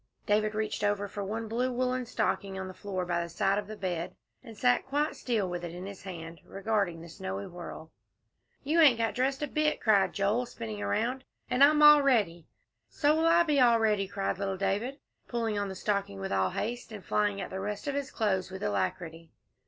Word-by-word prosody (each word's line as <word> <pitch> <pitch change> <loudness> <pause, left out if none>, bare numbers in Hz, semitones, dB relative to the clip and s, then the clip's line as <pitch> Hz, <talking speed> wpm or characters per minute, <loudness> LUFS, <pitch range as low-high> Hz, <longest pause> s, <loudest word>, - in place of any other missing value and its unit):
David 215 +1 +1
reached 215 -1 -2
over 205 0 +1
for 200 0 -5
one 220 +3 -4
blue 245 +4 0
woollen 255 0 -1
stocking 200 -3 -1
on 190 0 -4
the 185 - -8
floor 185 -2 -4
by 170 -1 0
the 170 - -5
side 195 +4 +1
of 205 - -6
the 215 0 -8
bed, 180 -2 -3 0.3
and 225 -4 -11
sat 245 +2 +3
quite 290 +3 0
still 225 -6 -1
with 175 -1 -4
it 170 0 -6
in 180 +1 -7
his 200 -1 -8
hand, 165 -3 -8
regarding 195 -4 -1
the - - -10
snowy 100 - -5
whirl. 170 -2 -9 0.7
"You 310 +4 +2
ain't 275 -7 +7
got 225 -1 0
dressed 265 +3 0
a - - 0
bit," 305 +2 0
cried 200 -4 +3
Joel, 210 +5 +1
spinning 110 - -6
around, 235 - -1 0.3
"and 250 +2 +5
I'm 300 +1 +6
all 295 0 +9
ready." 205 - +1 0.4
"So 295 0 +2
will 325 +1 +2
I 340 +1 +6
be 300 -4 +2
all 235 -2 +5
ready," 210 -3 +2
cried 195 -1 -2
little 195 -1 -2
David, 205 +8 -1 0.3
pulling 225 -3 -1
on 200 -1 -2
the 190 - -6
stocking 200 - -2
with 95 - -4
all 95 -1 +2
haste, 235 - -4
and 205 -3 -9
flying 205 -1 +1
at - - -5
the 190 - -4
rest 210 +6 -4
of 285 - 0
his 280 -1 -2
clothes 190 -5 0
with 190 0 -7
alacrity. 160 - -2
205 Hz, 215 wpm, -29 LUFS, 185-245 Hz, 0.7 s, all